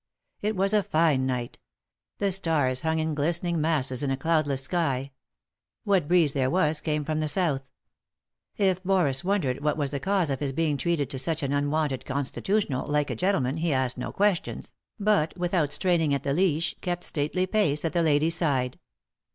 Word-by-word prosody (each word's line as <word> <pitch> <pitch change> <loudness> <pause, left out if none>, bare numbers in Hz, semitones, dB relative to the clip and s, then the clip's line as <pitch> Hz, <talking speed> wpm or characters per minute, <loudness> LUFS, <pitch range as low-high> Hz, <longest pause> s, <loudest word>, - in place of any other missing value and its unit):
It 210 +1 -1
was 195 +2 +1
a 210 - +4
fine 155 -7 +2
night 125 -2 -3 0.6
The 200 -1 0
stars 155 -8 +1
hung 160 0 0
in 160 0 -1
glistening 170 +3 0
masses 140 -5 0
in 140 - 0
a 135 - 0
cloudless 145 -3 0
sky. 140 -5 -1 0.7
What 195 -8 +2
breeze 165 -4 +3
there 130 -2 +1
was 155 -1 +1
came 150 -2 -1
from 155 0 -1
the 155 - 0
south. 145 -5 0 0.9
If 190 -2 +1
Boris 180 -7 +2
wondered 165 -9 0
what 150 0 +1
was 140 -3 -1
the 140 - -2
cause 190 -2 0
of 135 - -2
his 140 -2 -2
being 155 0 0
treated 150 -2 -1
to 130 - -2
such 160 +3 -2
an 140 0 -1
unwonted 145 -1 0
con 140 +1 -2
stitutional, 190 -4 -1
like 150 0 0
a - - -2
gentleman, 150 -8 0
he 165 0 0
asked 130 -2 0
no - - -4
questions, 200 -3 -1 0.3
but, 200 -6 +1
without 175 -4 0
straining 165 -6 +2
at 140 - -4
the 140 - 0
leash, 165 -1 +1
kept 175 -1 -3
stately 155 +5 0
pace 180 -7 +1
at 160 - -1
the 170 - +2
lady's 155 0 +3
side. 135 -7 0
155 Hz, 185 wpm, -26 LUFS, 140-175 Hz, 0.9 s, a